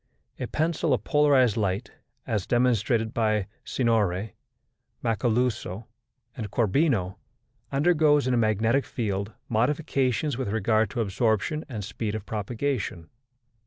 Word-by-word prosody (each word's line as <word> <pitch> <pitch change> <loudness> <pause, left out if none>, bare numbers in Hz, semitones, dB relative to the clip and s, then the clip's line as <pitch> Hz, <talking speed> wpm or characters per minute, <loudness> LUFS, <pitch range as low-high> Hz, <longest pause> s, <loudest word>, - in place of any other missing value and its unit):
A - - -3
pencil 155 -2 +1
of - - -7
polarized 140 -6 +4
light, 100 -2 -1 0.3
as 105 -4 -2
demonstrated 120 -2 +2
by 110 -3 +1 0.2
Signori 110 -5 0 0.7
Macaluzo 115 -2 0 0.5
and 110 -4 -5
Corbino, 110 - +1 0.5
undergoes, 150 -1 +3
in 130 - +1
a - - +3
magnetic 110 +4 +2
field, 100 -2 -3
modifications 130 +2 0
with 130 - -2
regard 110 +1 +2
to 125 -4 -2
absorption 110 +8 0
and 110 -6 -5
speed 105 +2 -4
of 110 -2 -5
propagation. 110 -4 -3
115 Hz, 115 wpm, -26 LUFS, 105-130 Hz, 0.7 s, polarized